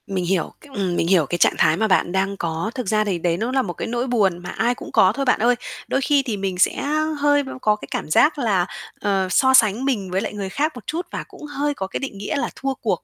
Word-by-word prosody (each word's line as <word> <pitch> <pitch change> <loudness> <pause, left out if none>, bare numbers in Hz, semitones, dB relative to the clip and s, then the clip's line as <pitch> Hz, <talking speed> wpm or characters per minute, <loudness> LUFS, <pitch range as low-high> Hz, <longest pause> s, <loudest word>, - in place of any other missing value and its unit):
Mình 190 -3 -2
hiểu 180 -1 -1
cái 295 - -16
ừm, 190 -4 -1
mình 165 - 0
hiểu 175 -4 +4
cái 175 - -2
trạng - - +4
thái 155 +1 +3
mà 220 +2 +1
bạn 185 -3 +2
đang 195 +1 0
có. 170 +5 -2
Thực 250 -5 -4
ra 215 +1 +2
thì 200 -4 -1
đấy 170 0 0
nó 230 +6 -2
là 265 0 +2
một 180 -8 -4
cái - - -5
nỗi 240 +2 -2
buồn 205 -8 +2
mà 175 - -8
ai 240 +2 0
cũng - - -10
có 185 - +5
thôi 275 - -1
bạn 255 - +3
ơi. 240 +3 +3 0.3
Đôi 270 - 0
khi 280 +1 +3
thì 230 -6 -3
mình 195 -2 -3
sẽ - - +3 0.4
hơi 290 0 +3
b 265 - -8
có 210 -1 +3
cái 210 - -11
cảm - - -3
giác 300 - +4
là, 200 -8 +2 0.3
ờ, 195 -2 0
so 260 +7 +4
sánh 225 0 +4
mình 205 -9 -1
với 190 +4 -2
người 200 -2 -4
khác 300 +10 0
một 245 - -11
chút 340 +3 -3
và - - -4
cũng 370 -6 -12
hơi 290 0 -2
có 190 -9 -4
cái - - -4
định 270 -7 -5
nghĩa 200 - -3
là 280 - -1
thua 270 0 -2
cuộc 215 -8 -2
210 Hz, 280 wpm, -22 LUFS, 190-265 Hz, 0.4 s, có